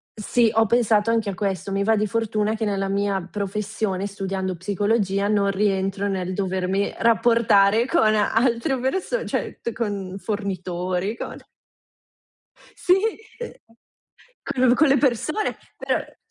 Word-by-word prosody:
Sì, 225 +2 +2
ho 225 -1 +3
pensato 225 -1 +3
anche 225 -2 +1
a - - -6
questo. 195 0 -3
Mi 195 0 0
va 220 +2 +3
di 215 - +1
fortuna 215 0 0
che 220 0 -2
nella 195 -1 -1
mia 200 0 0
professione, 205 -1 -2
studiando 195 -2 -3
psicologia, 200 +2 0
non 200 -1 +2
rientro 195 0 0
nel 185 -2 -2
dovermi 190 0 -1
rapportare 230 -1 +4
con 220 -9 +3
altre 235 +5 +1
perso 380 - -1
cioè, - - -3
t 235 - -2
con 200 -5 -4
fornitori, 185 -1 -3
con - - -6 1.4
Sì, 360 - +3 0.5
uhm 480 - -6 0.9
con 255 -1 +2
con 310 +5 +4
le 275 +1 +4
persone, 285 - 0 0.2
per - - -3
205 Hz, 130 wpm, -23 LUFS, 195-230 Hz, 1.4 s, rapportare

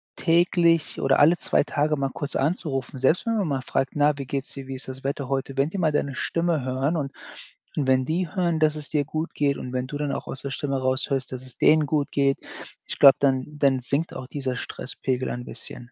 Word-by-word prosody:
täglich 170 -1 +2
oder 135 0 +3
alle 160 +4 +6
2 - - +2
Tage 150 +1 0
mal 135 -1 -1
kurz 145 - -4
anzurufen, 135 -3 -1
selbst 145 - +2
wenn 230 -1 +1
man 200 -5 0
mal 135 -3 -1
fragt: 135 0 -1
„Na, 150 0 +3
wie 140 - -4
geht 140 -1 -2
es - - -2
dir, 135 -1 -8
wie 135 - -5
ist 130 - -6
das 130 0 -8
Wetter 140 -1 -2
heute?“ 135 0 -2
Wenn 140 +2 +2
die 195 - -5
mal 160 -3 +2
deine 140 -2 -1
Stimme 165 -3 0
hören 135 +5 0
und 140 -3 -3 0.6
wenn 130 -2 +2
die 170 +4 -1
hören, 170 -3 +1
dass 155 -1 +3
es 150 -1 -4
dir 145 -2 +1
gut 155 +3 -4
geht, 140 -1 +1
und 125 - -6
wenn 125 0 -2
du 145 - -5
dann 145 -1 -2
auch - - -5
aus 135 - -5
der 140 - -4
Stimme 140 0 -2
heraus 130 +2 0
hörst, 135 -2 -1
dass 130 0 -6
es 130 - -11
denen 155 -1 +5
gut 145 -1 0
geht, 140 -1 +2 0.5
ich - - -6
glaube, 140 -2 +9
dann 135 -2 +2 0.2
dann 135 -2 +3
sinkt 140 +6 -2
auch 130 -1 -6
dieser 135 -2 -3
Stresspegel 130 0 -3
ein 120 0 -5
bisschen. 120 +1 -6
140 Hz, 240 wpm, -25 LUFS, 130-155 Hz, 0.6 s, glaube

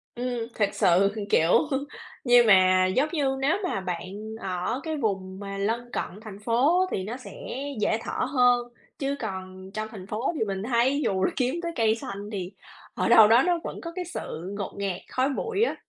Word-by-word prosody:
Ừm, 245 -2 -3
thực 205 -2 +2
sự, 190 +3 +4 0.2
kiểu, 165 +2 +3 0.7
nhưng 245 -2 +6
mà, 185 -2 +6
giống 260 +11 +1
như, 275 -5 0
nếu 290 +8 +2
mà 275 - -1
bạn 180 -1 -4 0.3
ở 185 +7 -2
cái 315 -2 -3
vùng 190 -5 -2
mà 195 -1 -6
lân 230 +4 -2
cận 200 - -4
thành 205 -3 -9
phố 250 - +3
á - - +3
thì 190 - -1
nó 230 +6 -5
sẽ 255 - -11 0.5
dễ 220 - +2
thở - - -2
hơn, 245 -3 +3 0.3
chứ 280 0 -1
còn 190 -2 -6
trong 215 0 -3
thành 195 -3 -9
phố 230 +11 -2
thì 220 - +1
mình 195 0 -3
thấy 255 +4 +2
dù 190 -1 +1
là - - +2
kiếm 255 +4 0
tới 335 - -2
cây 225 -1 +3
xanh 205 -2 -7
thì 190 -2 -4 0.4
ở - - 0
đâu 220 -2 +9
đó 230 +3 +6
nó 350 -2 +2
vẫn - - -6
có 335 - -6
cái 360 -1 -3
sự 185 - -6
ngột 200 - -4
ngạt, 195 -3 -2
khói 260 +2 +1
bụi 450 - -1
á. - - +1
220 Hz, 205 wpm, -26 LUFS, 190-260 Hz, 0.7 s, đâu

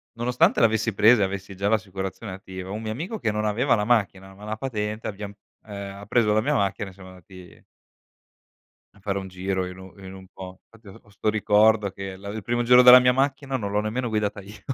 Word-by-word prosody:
Nonostante 125 +1 +2
l'avessi 110 -1 +2
presa 105 +2 +5
e - - +4
avessi 100 0 -6
già 100 +2 -1
l'assicurazione 95 -1 -3
attiva, 95 -1 -9
un 105 +3 -5
mio 110 - -4
amico 170 - -5
che 110 - -1
non 105 0 -2
aveva 115 +6 +1
la 105 -2 -1
macchina, 100 -4 0
ma 100 +2 -16
la 110 +1 -5
patente, 110 -3 -4
abbiam 100 0 -7 0.3
ehm, 100 -2 -8
ha - - -10
preso 105 0 +2
la 110 - +2
mia 145 +6 0
macchina 100 -3 -1
e 95 - -15
siamo 95 -1 -14
andati 90 0 -15 1.3
A 100 - -21
fare 100 0 -3
un 95 0 -8
giro 95 0 -3
in 90 0 -10
un 95 -1 -13
in 95 - -9
un 95 0 -12
po 95 0 -11
Infatti 115 -2 -21
ho 95 - -14
ho 100 - -25
'sto 100 +2 -2
ricordo 105 -1 +3
che 95 0 -8
la 100 +1 -11
il 110 +2 -5
primo 120 +2 -1
giro 125 +1 +7
della 125 0 +10
mia 125 0 +3
macchina 135 +1 -1
non 100 -5 -3
l'ho 105 - +1
nemmeno 115 +3 -2
guidata 105 -1 -2
io. 100 +2 -13
105 Hz, 230 wpm, -24 LUFS, 95-115 Hz, 1.3 s, della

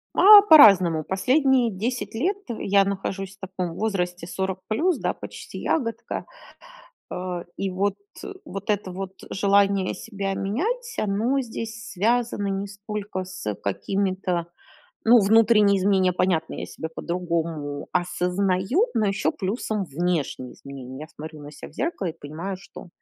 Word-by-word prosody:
А 410 +1 +10
по-разному, 195 - +7
последние 255 - +2
10 225 +5 -3
лет 355 - 0
я 200 -4 +2
нахожусь 195 0 -4
в 190 - -7
таком 180 -2 -4
возрасте 180 -5 -2
40 190 +1 -3
плюс, 320 +11 +1
да, - - -1
почти - - -9
ягодка. 230 -5 -2 0.9
Э, 180 -1 -4
и 195 - -2
вот, 195 +2 0 0.5
вот 195 +2 -5
это 205 -3 -1
вот 190 +1 -6 0.2
желание 200 -1 +2
себя 200 -3 -4
менять, 450 - -2
оно 220 +7 +1
здесь 225 -2 -6
связано 225 +1 0
не 195 +1 -2
сколько 205 -1 -5
с, 185 - -9
э, 105 - 0
какими-то, 185 - -1 0.6
ну 235 +2 +7
внутренние 210 -1 +5
изменения, 190 -1 +2
понятно, 175 -3 0
я - - -5
себя 160 - -7
по-другому 165 -5 -3
осознаю, 185 - +1
но 220 - +2
ещё 200 0 +1
плюсом 210 +1 -2
внешние 160 -5 -2
изменения. 135 -1 -9
Я 155 - -7
смотрю 155 0 -10
на 145 - -9
ся 150 - -10
в - - -17
зеркало 280 - -2
и 165 0 -6
понимаю, 165 +7 -5
что 190 - -12
195 Hz, 140 wpm, -24 LUFS, 180-220 Hz, 0.9 s, А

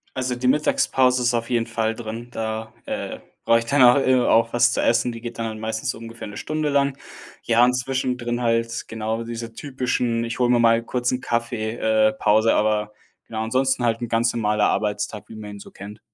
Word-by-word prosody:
Also, 130 -1 -1
die 125 +1 -2
Mittagspause 130 -2 +2
ist 120 0 +2
auf 115 0 -2
jeden 115 -2 +1
Fall 115 -1 -1
drin, 115 +1 -7
da, 110 0 -4
äh, - - -5 0.3
brauche 115 0 +5
ich 115 - -6
danach, 130 0 +6
äh, 130 - +4
auch 115 -1 +3
was 120 0 +4
zu - - 0
essen. 120 +1 +2
Die 115 -1 -9
geht 120 -1 -7
dann 115 - -1
halt 110 -1 -6
meistens 110 +3 -2
so - - -9
ungefähr 115 0 -9
'ne 105 - -9
Stunde 155 -1 -2
lang. 140 -1 +1 0.5
Ja, 115 +1 +4
und 125 +1 +4
zwischendrin 125 -1 -2
halt 115 -1 0
genau 110 +1 -3
diese 115 0 -6
typischen 125 -3 -1
„Ich 115 +1 -5
hole 125 -1 +3
mir 120 -1 +4
mal 115 0 +4
kurz 125 +1 -1
'n 125 0 -2
Kaffee, 115 -1 -2
äh, 110 -2 +3
Pause“, 110 +1 +3
aber 105 0 +1 0.4
genau, 110 -1 -3
ansonsten 130 +2 +1
halt 115 0 0
'n 120 - -2
ganz 115 0 +1
normaler 105 -2 +1
Arbeitstag, 105 +1 -2
wie 110 - -10
man 105 -1 -8
ihn 100 - -9
so - - -12
kennt. 105 +2 -10
115 Hz, 210 wpm, -22 LUFS, 110-125 Hz, 0.5 s, danach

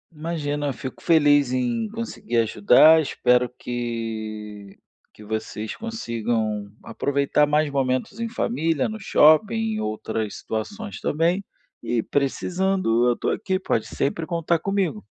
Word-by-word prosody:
Imagina, 145 -3 -2
fico 130 - -8
feliz 145 -5 +4
em 125 - -1
conseguir 220 - -4
ajudar. 120 +8 +6
Espero 125 -4 +2
que 110 -4 -5 0.4
que 105 - -13
vocês 110 0 -4
consigam 115 - -3
aproveitar 140 +1 +1
mais 150 0 +1
momentos 135 - -1
em 230 - -1
família, 165 - -1
no 220 0 -6
shopping, 155 +2 +5 0.2
em 215 - -3
outras 110 0 -3
situações 205 - -5
também 170 +6 0 0.4
e 120 -1 0
precisando, 145 - 0
eu 120 - +2
tô - - -1
aqui 190 -1 -1
pode 115 - -1
sempre 160 +4 -2
contar 170 0 0
comigo. 185 - -1
140 Hz, 125 wpm, -23 LUFS, 115-170 Hz, 0.4 s, ajudar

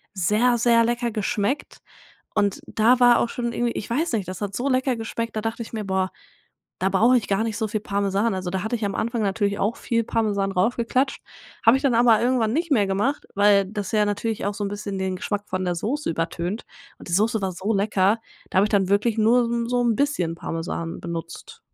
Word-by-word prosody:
sehr, 215 +7 +2
sehr 230 0 +4
lecker 240 0 -1
geschmeckt. 210 +4 -2 0.6
Und 200 -1 +1
da 240 +3 +3
war 245 -1 +6
auch 235 - 0
schon 235 -1 -3
irgendwie 240 -1 0
ich - - -5
weiß 295 +6 0
nicht, 205 -5 -1
das 185 +2 -6
hat 200 -1 -3
so 260 +3 -1
lecker 260 0 +1
geschmeckt, 230 0 -4
da 215 - -1
dachte 225 +1 -3
ich 225 - -13
mir: 215 -2 -3
„Boah, 190 -1 0 0.7
da 190 - +2
brauche 235 +6 +4
ich 215 - -6
gar 200 +2 +1
nicht 225 -2 -3
so 220 - 0
viel 215 0 -2
Parmesan.“ 200 +1 0
Also, 185 -1 -3
da 185 0 -2
hatte 220 +2 -1
ich 220 - -4
am 200 -1 -2
Anfang 230 0 -1
natürlich 200 0 0
auch 210 +4 0
viel 230 -1 -1
Parmesan 205 -4 0
raufgeklatscht. 235 +7 0 0.4
Habe 230 - +7
ich - - -10
dann 265 -3 +3
aber 230 -2 +5
irgendwann 240 -3 +2
nicht 335 +1 -1
mehr 210 -7 +3
gemacht, 205 +9 -1
weil 200 0 +5
das 205 -1 -5
ja 210 -1 +3
natürlich 210 +2 -2
auch 205 - -1
so 205 - -3
'n 200 - -1
bisschen 205 -1 -5
den 190 -1 -2
Geschmack 205 +2 -3
von 185 0 -2
der 180 -1 0
Soße 270 - -2
übertönt. 170 +5 -3 0.3
Und - - -12
die 170 - -5
Soße 220 +3 +2
war 190 - -1
so 190 +5 -2
lecker, 200 +1 +2 0.3
da - - -4
habe 200 - +5
ich - - -6
dann 195 -3 +2
wirklich 210 +3 +2
nur 235 +3 +4
so 230 - -3
'n 235 0 -1
so 245 0 +1
'n 230 -2 +2
bisschen 245 - 0
Parmesan 165 0 -4
benutzt. 170 - -7
215 Hz, 230 wpm, -23 LUFS, 195-235 Hz, 0.7 s, Habe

